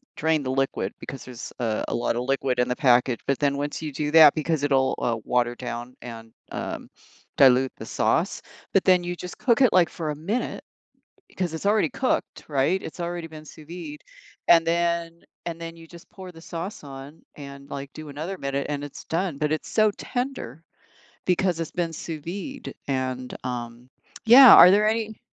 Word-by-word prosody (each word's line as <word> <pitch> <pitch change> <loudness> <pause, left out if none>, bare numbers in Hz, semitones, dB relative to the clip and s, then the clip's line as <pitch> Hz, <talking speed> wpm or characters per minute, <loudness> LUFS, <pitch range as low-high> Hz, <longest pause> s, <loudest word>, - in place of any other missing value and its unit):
drain 160 0 +1
the 130 - -3
liquid 135 0 -1
because 135 - -8
there's, 125 -2 -9
uh, 110 -3 -1
a - - -3
lotta 120 0 -1
liquid 135 0 -1
in 125 - +2
the 125 - -1
package, 125 -2 +3
but 140 -1 +1
then 140 -1 +1
once 145 +2 -3
you 155 - -4
do 150 +2 -2
that 155 -2 +8
because 155 -1 -1
it'll, 135 -2 +2
uh, 120 -1 0
water 120 -1 +1
down 120 0 -6
and, 115 -2 -9 0.2
um, - - -5 0.5
dilute 130 -1 +5
the - - -8
sauce, - - 0 0.3
but 195 - +4
then 185 -2 +4
you 175 0 -3
just 180 0 -8
cook 240 -1 +2
it, 255 - +6
like, 180 -2 +4
for 160 -3 -5
a 150 - -2
minute 195 +11 -3 0.7
'cause 180 -3 -2
it's 160 - -4
already 210 +4 +3
cooked, 260 0 -2
right? 150 +6 +1
It's 160 - -8
already 170 -1 -4
been 155 -1 -11
sous 155 0 -14
vide, 180 - -8 0.5
and 165 -1 +6
then 170 0 -1 0.2
and 170 -1 -5
then 165 0 -7
you 165 0 -13
just 170 +1 -15
pour 185 -2 -10
the 165 - -14
sauce 175 +6 -6
on 140 +3 -10
and, 140 -1 -10
like, 140 0 -6
do 155 -1 -9
another 160 +7 -5
minute, 140 -1 -2
and 145 -1 -3
it's 145 - -10
done; 170 -1 -2
but 150 0 0
it's 155 - -3
so 215 -1 +3
tender 245 - -4 0.6
because 180 -1 +1
it's 165 - -3
been 170 -2 -2
sous 160 -1 -6
vide, 200 - -6
and, 130 -2 -3
um, 120 -1 -6 0.4
yeah, 250 +2 +10
are 180 - +10
there 210 +2 +4
any 220 -1 -3
155 Hz, 190 wpm, -25 LUFS, 135-175 Hz, 0.7 s, yeah